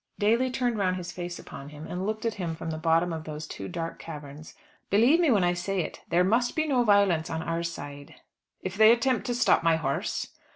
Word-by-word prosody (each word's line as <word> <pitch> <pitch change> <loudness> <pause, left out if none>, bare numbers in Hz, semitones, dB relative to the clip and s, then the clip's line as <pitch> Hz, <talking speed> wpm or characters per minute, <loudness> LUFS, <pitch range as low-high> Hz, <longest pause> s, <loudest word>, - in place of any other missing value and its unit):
Daly 230 +5 +2
turned 245 -3 -1
round 185 -2 +1
his 175 -1 -5
face 175 0 -6
upon 140 +1 -10
him, 150 +1 -10
and 180 +3 -4
looked 215 +1 -3
at 225 - +1
him 165 -2 -2
from 160 - -5
the 155 - -4
bottom 165 +1 +2
of 160 -1 -6
those 155 0 -6
two 95 - -7
dark 165 - -5
caverns. 150 -1 -9 0.3
"Believe 240 - +5
me 340 -4 +3
when 210 -7 +4
I 175 0 +3
say 180 +2 -1
it; - - -6
there 175 +2 +3
must 235 +6 +1
be 315 - +1
no 255 -4 +3
violence 200 -7 +3
on 160 0 -3
our 165 0 -2
side." 145 -4 -7 0.5
"If 185 +1 -4
they 220 +2 +7
attempt 240 0 +1
to 245 - -1
stop 245 - +4
my 165 -1 +3
horse?" 140 -4 -2
175 Hz, 225 wpm, -27 LUFS, 160-220 Hz, 0.5 s, they